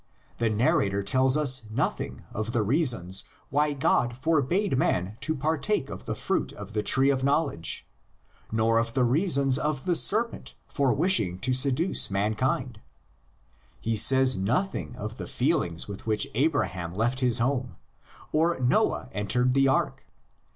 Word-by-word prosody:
The 115 -1 +1
narrator 105 -3 +1
tells 130 +5 +2
us 135 -4 +3
nothing 110 - -3
of 110 +2 -4
the 115 - +1
reasons 110 - +2 0.3
why 150 +2 +1
God 125 -4 0
forbade 160 +5 0
man 95 -6 0
to 155 - 0
partake 155 - -1
of 95 - -9
the - - -3
fruit - - -2
of 105 0 -10
the 105 - 0
tree 135 +6 +3
of 130 -1 -2
knowledge, 140 - -1 0.7
nor 115 +1 +2
of 115 +1 -3
the 130 - +2
reasons 140 0 +2
of 150 -3 -2
the 180 - +1
serpent 220 +7 +1
for 140 -4 0
wishing 145 - +2
to 130 0 +1
seduce 140 +7 +3
mankind. 110 +6 -2 1.0
He 115 0 -2
says 130 +4 +4
nothing 125 - -2
of 110 +3 -7
the - - -6
feelings 120 - -1
with 100 +2 -9
which 110 -1 +2
Abraham 95 - -1
left 120 +5 0
his 125 -3 +3
home, 125 +1 -1 0.6
or 165 0 +1
Noah 130 - +1
entered 125 +5 0
the 135 0 +3
ark. 135 - -1
130 Hz, 150 wpm, -26 LUFS, 110-145 Hz, 1.0 s, says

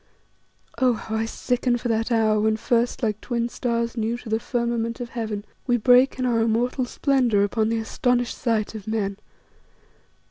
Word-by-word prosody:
Oh! 255 -2 +4
how 220 0 -5
I 220 0 0
sicken 245 +1 0
for 240 - -4
that 225 +1 0
hour 220 -2 +3
when 220 +1 +2
first, 240 +3 0
like 215 -2 -1
twin 235 -1 -2
stars 235 -1 -2
new 230 +1 -1
to 240 -2 -10
the 220 +1 +1
firmament 235 -1 -2
of 240 -1 -5
heaven, 220 -3 -4 0.2
we 245 -1 +3
break 250 +3 +5
in 255 - -1
our 235 -2 +2
immortal 240 +3 +1
splendour 245 -5 +2
upon 215 +2 0
the 230 - 0
astonished 245 +2 0
sight 225 -4 -1
of 215 -2 -8
men. 205 -3 -1
230 Hz, 175 wpm, -24 LUFS, 220-245 Hz, 0.2 s, break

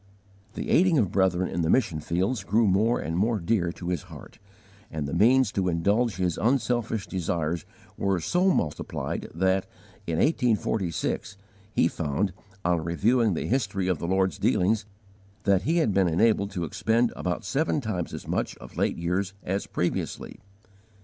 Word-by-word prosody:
The - - -3
aiding 175 -1 +4
of 105 -8 +2
brethren 95 -2 +2
in 85 - -2
the 80 - 0
mission 105 -9 +2
fields 95 - -1
grew 110 +4 +2
more 105 +5 +3
and 80 +1 -3
more 110 +5 +2
dear 90 -1 0
to 90 -1 -6
his 90 - -1
heart, - - -12 0.5
and 75 -2 -3
the 70 - -5
means 120 +5 +4
to 95 -2 0
indulge 100 +7 +1
his 90 -3 -1
unselfish 120 -3 0
desires 85 -3 -2 0.3
were 95 -2 +1
so 180 - +2
multiplied 75 - -2
that, 95 +2 +1 0.4
in 85 - -1
1846, 110 - 0 0.3
he 85 - +3
found, 85 +4 -1 0.3
on 85 -2 +2
reviewing 105 +5 +2
the - - -2
history 100 -6 0
of 90 -5 0
the 85 - -3
Lord's 95 +1 +1
dealings, 105 +3 +2 0.6
that 100 -2 +3
he 170 - +3
had 155 -12 +2
been 95 -1 +3
enabled 100 +4 +2
to 90 -3 -2
expend 115 - +1
about 90 -1 -3
seven 150 +2 0
times 105 -9 -3
as - - -7
much - - -2
of - - -13
late - - +1
years 90 +3 -1
as 95 +2 -2
previously. - - -3
95 Hz, 165 wpm, -26 LUFS, 85-115 Hz, 0.6 s, aiding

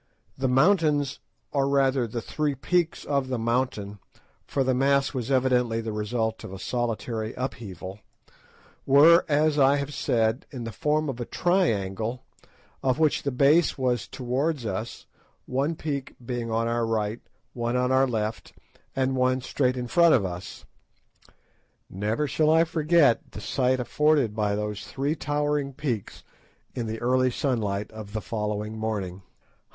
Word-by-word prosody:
The 130 - -1
mountains, 145 -1 +3 0.3
or 140 -1 +1
rather 135 -3 +2
the 115 +1 -5
three 150 -2 -1
peaks 170 +4 0
of 140 -2 0
the 130 -1 -2
mountain, 115 -3 -1 0.5
for 135 - 0
the 130 0 +1
mass 140 +2 +2
was 125 -3 -3
evidently 125 -3 +2
the 115 -1 -4
result 110 +1 -2
of - - -8
a 95 - -7
solitary 115 0 -3
upheaval, 100 -7 -6 0.9
were, 155 +6 +7
as 150 0 +2
I 135 +1 +5
have 140 0 -3
said, 115 0 0
in 125 -4 -7
the 115 - -5
form 150 +8 0
of 130 -3 -4
a 120 - -3
triangle, 115 - 0 0.6
of 130 -1 +1
which 155 -2 +2
the 140 - -1
base 140 +6 +3
was 125 -4 0
towards 130 +2 -2
us, 110 +3 -4 0.4
one 140 +6 -1
peak 140 -4 -4
being 120 -2 -3
on 115 +1 0
our 115 0 0
right, 110 0 -1 0.3
one 120 0 -2
on 125 0 +1
our 130 +1 +4
left, 110 -2 -3 0.4
and 130 0 +1
one 130 0 +2
straight 130 0 0
in 125 - -3
front 170 +6 +5
of 105 -7 +1
us. 90 +2 -7 1.3
Never 105 +9 -1
shall 155 +2 +2
I 160 +1 +5
forget 160 -5 +2
the - - -6
sight 130 -1 0
afforded 140 -3 +2
by 105 -2 0
those 105 0 -3
three 140 +3 -1
towering 145 -1 -1
peaks 130 -7 -4 0.5
in 120 -3 -3
the 110 +1 -4
early 130 +1 +3
sunlight 110 -6 -1
of 110 -2 -9
the 110 - -2
following 105 0 -3
morning. 100 -4 -3
125 Hz, 155 wpm, -26 LUFS, 110-140 Hz, 1.3 s, were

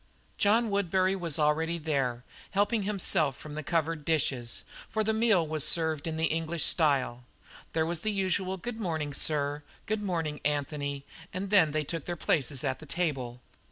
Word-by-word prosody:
John 220 +2 +3
Woodbury 190 -1 +2
was 170 -6 -1
already 160 +2 +2
there, 135 -6 -1 0.3
helping 205 +3 +2
himself 190 -8 +1
from 150 - -9
the 155 - -3
covered 165 -1 0
dishes, 135 -6 0 0.3
for 220 - 0
the 220 +1 +1
meal 220 -7 +3
was 155 -2 +1
served 160 -1 +2
in 160 -1 -2
the 160 - +2
English 165 +1 0
style. 135 -6 +2 0.5
There 160 0 +2
was 170 0 -2
the 215 - 0
usual 190 -1 0
"Good 230 +4 -5
morning, 160 -6 -2
sir," 145 0 0 0.2
"Good 215 -1 -1
morning, 165 -6 -2
Anthony," 145 -1 -1 0.3
and 190 +2 -4
then 180 -7 +6
they 155 0 0
took 165 +1 -4
their 175 - -3
places 140 -5 0
at 135 -2 -1
the 155 - -11
table. 135 -7 -2
160 Hz, 170 wpm, -29 LUFS, 145-185 Hz, 0.5 s, then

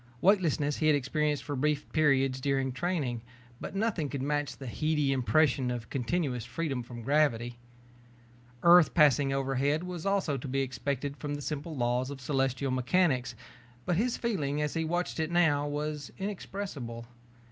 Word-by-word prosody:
Weightlessness 165 -6 +2
he 155 - +1
had 155 - +5
experienced 145 +1 0
for 145 - -4
brief 150 +2 0
periods 135 -4 +2
during 135 -1 0
training, 135 -5 -2 0.4
but - - -7
nothing 195 -8 0
could 135 -2 -3
match 145 0 -1
the 135 - -9
heady 150 +2 0
impression 130 +1 +2
of 120 -2 -5
continuous 135 -2 -1
freedom 135 +2 -3
from 120 0 -9
gravity. 120 -4 +1 1.0
Earth 175 -1 +7
passing 145 -4 +5
overhead 135 +3 0
was 180 -2 -6
also 195 -8 +1
to 135 - -6
be 135 +1 0
expected 140 +2 -3
from 145 -1 -4
the 145 - -6
simple 150 +1 -4
laws 125 +1 0
of 140 -1 -7
celestial 135 0 0
mechanics 130 -2 +1 0.5
but 180 - +1
his 235 +6 0
feeling 150 - -1
as 150 -1 -1
he 165 - -1
watched 175 +1 -2
it 160 0 0
now 160 -4 +3
was 150 -1 -4
inexpressible. 190 - -5
145 Hz, 160 wpm, -30 LUFS, 130-160 Hz, 1.0 s, Earth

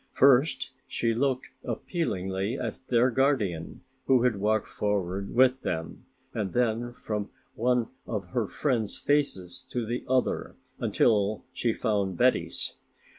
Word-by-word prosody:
First 135 0 +4 0.2
she 115 -1 0
looked 130 +2 0
appealingly 105 - -2
at - - -4
their 125 +1 +4
guardian, 115 - 0 0.3
who 130 -2 +5
had 125 -5 +2
walked 105 +1 +1
forward 100 -1 -2
with 130 +1 +5
them, 80 0 -4 0.3
and 100 -5 -2
then 120 0 +1
from 105 -4 -4 0.2
one 125 0 +1 0.2
of 100 -5 -3
her 110 +2 0
friends' 120 -6 -1
faces 135 -10 0
to 120 -2 -2
the 120 +3 -3
other 130 0 0 0.2
until 105 -2 +2
she 120 - +1
found 100 -6 0
Betty's. 125 +1 +1
115 Hz, 125 wpm, -28 LUFS, 100-125 Hz, 0.3 s, who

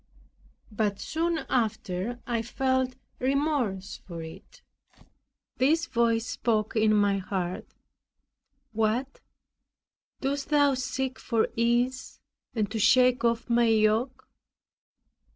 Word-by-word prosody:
But 205 -2 -1
soon 330 +1 -1
after 220 -2 -1
I 235 -3 -1
felt 260 +2 0 0.2
remorse 260 -8 -1
for 170 -3 -6
it; 160 0 -12 0.9
this 315 +6 +3
voice 230 -5 +1
spoke 220 -3 -1
in 215 -1 +3
my 200 -1 +2
heart, 185 -2 -4 1.0
"What, 225 +5 -1 1.0
dost 275 +1 -2
thou 290 -2 +4
seek 260 0 -3
for 230 -3 0
ease, 240 +2 0 0.4
and 215 -2 -1
to 225 - -2
shake 255 +2 +4
off 230 -1 +1
my 235 0 +3
yoke?" 225 +3 +1
235 Hz, 100 wpm, -27 LUFS, 215-260 Hz, 1.0 s, thou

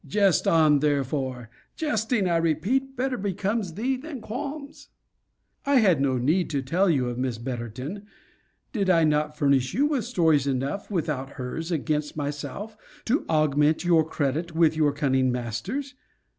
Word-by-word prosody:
Jest 200 -3 +2
on, 155 -3 +5
therefore. 135 -4 -1 0.2
Jesting, 225 - 0
I 170 -1 +2
repeat, 205 - 0
better 255 0 -1
becomes 200 -1 -2
thee 255 +5 0
than 285 0 -7
qualms. 280 +6 -7 0.8
I 280 0 +2
had 190 - +4
no 135 -2 +1
need 155 +9 +1
to 140 -3 -1
tell 180 +8 +2
you 135 -6 +2
of 120 0 -4
Miss 125 -3 -1
Betterton. 125 - -6 0.7
Did 200 -5 0
I 165 -3 +5
not 150 0 +1
furnish 135 -3 +2
you 280 - +3
with 290 -6 0
stories 160 - +2
enough, 135 +8 -2
without 150 -8 -2
hers, 155 +7 -5
against 150 -2 -1
myself, 150 +9 -5 0.3
to 260 +7 0
augment 155 +1 +2
your 170 -2 +5
credit 155 +2 -2
with 160 -1 +4
your 155 -2 +3
cunning 130 -3 +1
masters? 185 - -4
160 Hz, 150 wpm, -25 LUFS, 140-205 Hz, 0.8 s, on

